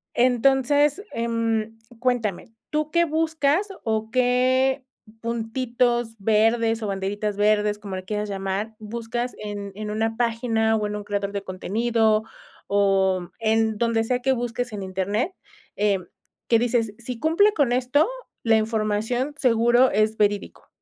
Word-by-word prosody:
entonces, 270 - +3
em, 225 -1 -1 0.2
cuéntame, 225 -4 -1 0.2
¿tú 305 0 -1
qué 340 +1 +3
buscas, 320 +3 +1 0.2
o 220 0 -1
qué 255 +2 +2 0.4
puntitos 235 0 -1
verdes, 225 +2 +2
o - - -1
banderitas 200 +1 -2
verdes, 210 0 +2
como 200 -2 -6
le 185 - -6
quieras 210 +1 -3
llamar, 195 +3 -3
buscas 235 +3 -4
en 205 -1 -6
en 210 0 -5
una 225 +1 -1
página, 230 -1 +1
o 210 - -1
en 210 - -4
un 205 - -5
creador 200 -1 -2
de 200 -1 -3
contenido 220 +3 +1 0.5
o 190 -3 +2
en 220 0 +2
donde 230 -1 +1
sea 250 +2 0
que 265 +1 +3
busques 245 0 -3
en 205 -2 -5
internet, 195 - -1 0.4
eh, 205 -2 +2 0.5
que 230 - +5
dices, 230 -3 0
si 240 0 -6
cumple 340 - +4
con 285 - +1
esto, 255 - +2 0.4
la 225 -1 +5
información 220 +5 -1
seguro 240 -1 +4
es 215 +2 +1
verídico. 205 -1 -1
225 Hz, 140 wpm, -24 LUFS, 210-250 Hz, 0.5 s, que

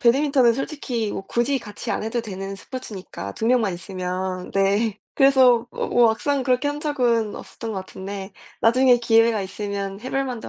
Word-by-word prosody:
배드민턴은 260 -1 +4
솔직히 255 -6 -3
뭐 - - -4
굳이 255 +4 +1
같이 210 -4 -7
안 - - -1
해도 225 +2 -1
되는 195 -2 -6
스포츠니까 195 - -7
2 225 - -2
명만 230 -5 +3
있으면. 185 0 -4
네. 200 +2 +1 0.2
그래서 260 -4 +5
뭐 - - -3
뭐 240 -1 +5
막상 270 +5 0
그렇게 255 +2 +1
한 290 +1 -3
적은 240 -8 +1
없었던 220 +4 -7
것 195 - -3
같은데 195 +1 -7 0.3
나중에 250 +2 +5
기회가 225 -2 +3
있으면 200 0 -4
해 255 +3 -6
볼 270 0 0
만도 250 -4 -5
230 Hz, 355 characters per minute, -23 LUFS, 195-255 Hz, 0.3 s, 그래서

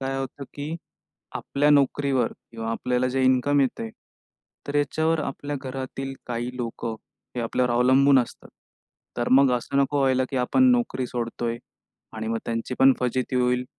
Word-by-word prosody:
काय 135 0 -2
होतं 135 +1 -5
की 145 +3 -4 0.6
आपल्या 145 +1 +1
नोकरीवर 140 -3 +2 0.2
किंवा 115 -1 -5
आपल्याला 125 +2 0
जे 130 +1 0
इन्कम 130 +3 +3
येत 135 -2 0
आहे, 115 - -4 0.8
तर 145 - -5
याच्यावर 155 +3 +1
आपल्या 145 0 -4
घरातील 135 0 -5
काही 120 +1 -4
लोकं 115 -1 -4 0.4
हे - - -1
आपल्यावर 125 +2 0
अवलंबून 130 +3 +5
असतात. 120 - -4 0.7
तर 120 - -1
मग 135 0 +6
असं 120 +3 -4
नको 140 +1 +2
व्हायला 130 -1 +3
की 135 - -3
आपण 130 - +3
नोकरी 240 - 0
सोडतो 120 -1 -4
आहे 115 0 -3 0.6
आणि 110 0 -4
मग 115 0 -1
त्यांची 115 +2 -3
पण 135 0 +7
फजिती 125 +1 -1
होईल 125 0 +1
130 Hz, 160 wpm, -25 LUFS, 120-140 Hz, 0.8 s, पण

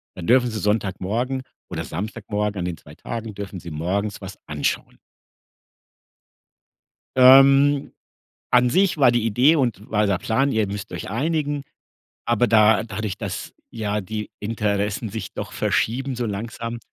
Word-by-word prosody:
dann 90 - -7
dürfen 125 0 +4
sie 110 - -4
Sonntagmorgen 110 +5 -1 0.3
oder - - -4
Samstagmorgen 105 +2 -3
an 90 - -2
den 90 -2 -4
2 - - -15
Tagen, 115 -3 -6
dürfen 100 -2 -6
sie 85 - -9
morgens 95 +7 -2
was 95 0 -9
anschauen. 75 -1 -2 2.2
Ähm. 135 +2 +6 0.6
An 125 0 +5
sich 185 +4 +2
war 135 -4 +6
die 120 -2 +1
Idee 125 +9 +4
und 120 -6 -1
war 105 -1 +2
der 100 -3 +1
Plan: 135 +5 +1
„Ihr 110 -1 +1
müsst 100 +1 -6
euch 90 - -6
einigen“, 145 - -1 0.6
aber 120 +1 +2
da 110 -1 +5
dadurch, 110 -2 -4
dass - - -5 0.2
ja 105 -2 -2
die 105 +3 -5
Interessen 105 0 -1
sich 110 +2 -6
doch - - -6
verschieben 130 +3 0
so 120 0 -2
langsam, 115 +2 -5
110 Hz, 145 wpm, -23 LUFS, 100-125 Hz, 2.2 s, Ähm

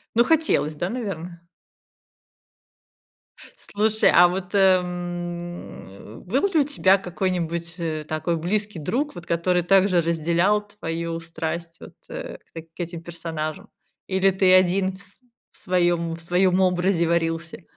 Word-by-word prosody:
Ну, 235 - +6
хотелось, 310 - +1
да, 175 +4 -2
наверно? 180 -7 -5 2.3
Слушай, 215 +1 +3
а 175 +1 +8
вот, 180 0 -4
м, 175 - -2
был 265 - +1
ли 320 - +4
у - - +5
тебя 200 -9 +3
какой-нибудь, 170 -2 -3
э, 160 -2 -3
такой 155 +2 -1
близкий 205 +4 -2
друг, 250 - -2
вот 175 -1 -9
который 175 +1 +1
также 190 0 +4
разделял 170 +6 +1
твою 170 -5 -4
страсть 165 0 -5
вот, - - -12
э, - - -7 0.2
к 165 +1 -11
этим 170 -1 -5
персонажам 165 -2 -5 0.4
или 190 0 +2
ты 190 -1 +3
один 185 +1 +4
в 190 - -15
св 200 - -15 0.5
в - - -12
своем, 175 -2 +1
в - - -12
своем 180 +2 +2
образе 180 -1 +2
варился. 165 +1 -1
175 Hz, 130 wpm, -23 LUFS, 165-190 Hz, 2.3 s, а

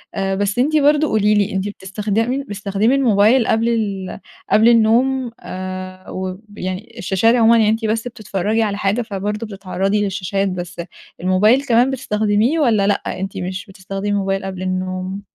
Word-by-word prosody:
أ 195 0 -1
بس 200 +3 -1
أنتِ 295 +5 +2
برضه 300 +1 +4
قولي 210 -3 +2
لي، 205 0 +1
أنتِ 190 +1 -1
بتستخدم 210 +7 -2
بتستخدمي 205 +4 0
الموبايل 230 -1 +4
قبل 225 +1 +2
ال 200 -6 -2 0.3
قبل 220 +2 +6
النوم 240 +2 +3
آآ 185 0 -7
وب 185 +1 -5 0.2
يعني 185 +5 -5
الشاشات 195 +6 +2
عمومًا، 230 -1 +5
يعني 220 -2 +4
أنتِ 225 +1 0
بس 225 +2 -1
بتتفرّجي 215 -1 -1
على 205 -2 -2
حاجة، 205 +4 0
فبرضه 210 0 -4
بتتعرّضي 195 0 -1
للشاشات 195 0 -1
بس 175 -1 -5 0.4
الموبايل 210 +9 +3
كمان 245 +1 +3
بتستخدميه، 220 +3 +1
والّا 220 -8 +3
لأ 205 - -1
أنتِ 195 +1 -5
مش 185 +1 -4
بتستخدمي 195 +1 -5
موبايل 195 -1 -1
قبل 190 -1 -5
النوم؟ 185 +1 -3
205 Hz, 155 wpm, -19 LUFS, 190-230 Hz, 0.4 s, قبل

